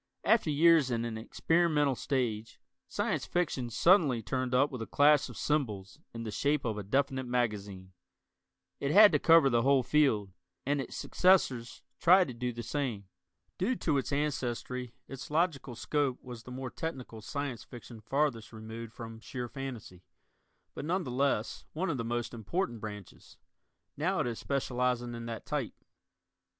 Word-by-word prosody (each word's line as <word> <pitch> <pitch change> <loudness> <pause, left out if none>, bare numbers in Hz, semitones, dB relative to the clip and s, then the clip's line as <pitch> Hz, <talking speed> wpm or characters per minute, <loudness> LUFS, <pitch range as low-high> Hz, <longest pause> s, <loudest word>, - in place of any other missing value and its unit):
After 220 -7 +3
years 155 -1 +5
in 115 -1 -1
an 115 -1 -4
experimental 150 +5 +1
stage, 115 -5 -2 0.3
Science - - -2
Fiction 150 -8 -1
suddenly 140 - +4
turned 130 +2 -1
up 140 +3 +3
with 130 -3 -6
a 115 - -4
clash 145 0 +4
of - - -10
cymbals 125 -6 -2
in 115 0 -6
the 110 - -4
shape 145 +5 0
of 110 -2 -1
a 105 - -4
definite 130 +4 0
magazine. 105 -6 -2 0.9
It 140 - -1
had 205 +6 +8
to - - +2
cover 165 -4 +6
the 120 -3 +3
whole 135 +1 +4
field, 115 -10 +2 0.3
and 145 +1 +1
its - - -7
successors 135 -10 +2 0.2
tried 180 -2 +6
to - - -5
do 125 +1 -3
the 120 0 -6
same. 115 -10 -3 0.5
Due 230 +8 +1
to 150 - +1
its 135 - -4
ancestry 125 -4 -2
its 135 -1 -8
logical 150 -5 0
scope 135 +1 0
was 125 -3 -8
the 125 - -9
more 130 0 -5
technical 130 -8 -6
Science 140 0 -4
Fiction 120 -2 -11
farthest 120 -2 -1
removed 110 +1 -8
from 115 -1 -8
sheer 125 +1 -5
fantasy, 120 -9 -7 0.7
but, - - -6
none 180 +5 0
the 125 - -5
less, 130 -3 0
one 170 +2 -1
of 145 - -2
the - - -1
most 120 +1 -3
important 120 - -3
branches. 105 -3 -9 0.6
Now - - 0
it - - -1
is 120 -2 -3
specializing 125 -3 -1
in 115 0 -6
that 115 -1 -6
type. - - -3
125 Hz, 165 wpm, -31 LUFS, 115-145 Hz, 0.9 s, had